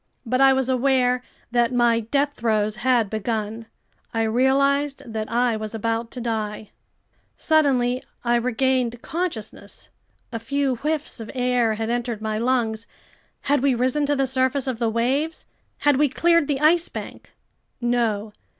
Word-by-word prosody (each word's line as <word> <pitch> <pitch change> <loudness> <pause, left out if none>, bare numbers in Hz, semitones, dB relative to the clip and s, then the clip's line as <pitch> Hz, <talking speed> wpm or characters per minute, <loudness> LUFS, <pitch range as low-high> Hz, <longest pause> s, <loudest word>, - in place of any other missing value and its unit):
But 255 +3 +1
I 270 0 +7
was 265 -1 +1
aware 255 -1 +2 0.3
that 240 0 +2
my 240 -1 +3
death 280 +6 0
throes 215 -3 0
had 245 -3 +2
begun. 220 +1 -3 0.5
I 225 - +2
realized 275 +4 +2
that 220 -2 -5
I 240 0 +2
was 215 0 -5
about 230 +1 -2
to 250 - -7
die... 215 -3 -3 0.7
Suddenly 260 -6 +2 0.2
I 240 0 +2
regained 250 0 0
consciousness. 230 - -5 0.4
A 230 - -4
few 270 +2 -1
whiffs 300 0 -2
of 225 - -7
air 245 -3 +1
had 225 +1 -2
entered 240 -2 -2
my 215 0 -2
lungs. 230 -2 0 0.5
Had 285 -1 +1
we 270 -2 +3
risen 260 +4 +1
to 290 - +2
the 270 -1 +1
surface 260 +1 0
of 255 -4 -3
the 230 -2 +1
waves? 265 +8 -1 0.3
Had 290 -2 +3
we 295 0 +3
cleared 335 +2 +3
the 285 -2 -1
Ice 330 +3 +4
Bank? - - -9 0.5
No! 230 -4 0
245 Hz, 150 wpm, -23 LUFS, 225-270 Hz, 0.7 s, I